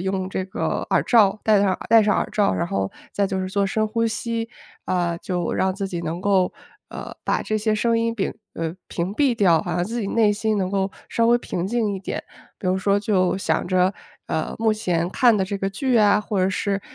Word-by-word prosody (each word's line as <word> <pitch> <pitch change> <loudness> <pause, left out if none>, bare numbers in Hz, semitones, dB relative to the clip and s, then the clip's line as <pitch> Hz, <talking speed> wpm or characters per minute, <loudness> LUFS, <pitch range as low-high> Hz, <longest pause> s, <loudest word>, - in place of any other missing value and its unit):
用 190 0 -2
这 190 0 -3
个 - - -2
耳 - - +3
罩， 215 -4 +4
戴 210 -2 +5
上 200 - +3
耳 - - -6
戴 225 -1 +7
上 210 -1 +2
耳 - - 0
罩， 205 -2 +2
然 170 - -1
后 95 - -2 0.2
再 200 - +1
就 190 0 -2
是 185 - -3
做 200 +1 +1
深 215 +2 0
呼 230 +2 0
吸， 230 0 -3 0.4
呃， 175 -2 0
就 175 -2 -2
让 190 0 +1
自 195 -1 -3
己 175 -3 -4
能 170 +1 -4
够， 195 -2 +2 0.4
呃， - - -8
把 - - 0
这 215 - -1
些 215 0 0
声 230 +2 +1
音 230 0 -1
摒 195 - -2 0.2
呃， 165 0 -3
屏 180 +3 -3
蔽 255 -1 +2
掉， 175 -6 +4
好 175 - -4
像 175 - +1
自 235 +4 -3
己 205 - -2
内 215 -3 +3
心 215 +1 0
能 185 - 0
够 195 -1 0 0.2
稍 230 - +2
微 240 +1 +5
平 180 -6 -3
静 220 -1 0
一 190 - -5
点。 195 - -5 0.3
比 - - -5
如 185 +1 +2
说 200 +1 +2
就 190 -3 +1
想 195 - 0
着， 185 0 +3 0.3
呃， 160 - -2
目 220 -1 +2
前 180 -6 -1
看 240 -4 +4
的 190 - +1
这 200 +2 -3
个 195 - -1
剧 245 +4 0
啊， 210 0 +5
或 210 -1 -3
者 185 - +3
是， 195 +1 -1
200 Hz, 250 characters per minute, -23 LUFS, 185-220 Hz, 0.4 s, 戴